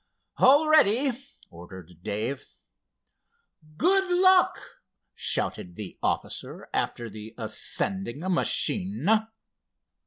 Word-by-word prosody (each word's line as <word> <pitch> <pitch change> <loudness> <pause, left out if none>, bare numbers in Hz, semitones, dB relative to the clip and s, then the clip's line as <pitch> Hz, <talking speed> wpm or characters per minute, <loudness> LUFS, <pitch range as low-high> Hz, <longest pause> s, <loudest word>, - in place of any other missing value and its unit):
"All 285 +4 +5
ready," 280 -3 +4 0.4
ordered 85 0 -13
Dave. 110 +7 -4 1.3
"Good 380 +1 +1
luck!" 370 +1 +4 0.6
shouted 90 -1 -1
the 100 -2 -8
officer - - -4
after 120 - -2
the 110 0 -10
ascending 150 - -1
machine. 190 +1 +1
170 Hz, 75 wpm, -25 LUFS, -, 1.3 s, All